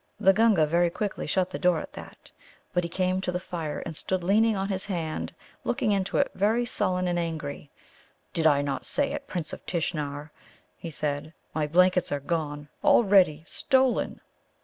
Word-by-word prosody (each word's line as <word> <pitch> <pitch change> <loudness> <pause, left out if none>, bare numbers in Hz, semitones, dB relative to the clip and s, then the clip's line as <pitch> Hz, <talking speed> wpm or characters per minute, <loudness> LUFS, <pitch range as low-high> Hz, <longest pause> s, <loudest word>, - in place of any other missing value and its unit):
The 195 -2 +6
Gunga 210 -6 +4
very 170 +3 +2
quickly 200 +4 -3
shut 185 -1 +1
the - - -4
door 180 -2 +3
at - - -8
that. - - -12 0.4
But 180 - +2
he 170 - -3
came 185 +1 0
to 180 - -1
the 180 - -2
fire 165 -4 -4
and 165 - -5
stood 185 +3 -2
leaning 215 +3 +3
on 195 0 -1
his 190 -2 -2
hand, 170 -6 -3 0.3
looking 210 - 0
into 195 -1 0
it, 280 - +2
very 220 +5 +2
sullen 185 -5 0
and 175 -1 0
angry. 155 -4 -4 0.6
"Did 160 -1 +3
I 145 -2 +4
not 140 -1 -2
say 280 -1 -1
it, 280 - -6
Prince 170 -4 -4
of - - -8
Tishnar?" 150 -4 -3 0.4
he 170 - -7
said. 150 +1 -3 0.2
"My 155 -1 0
blankets 180 +2 +3
are 145 - 0
gone 145 -1 -3 0.2
already. 190 -8 +5
Stolen!" 260 +4 +1
180 Hz, 180 wpm, -27 LUFS, 155-195 Hz, 0.6 s, The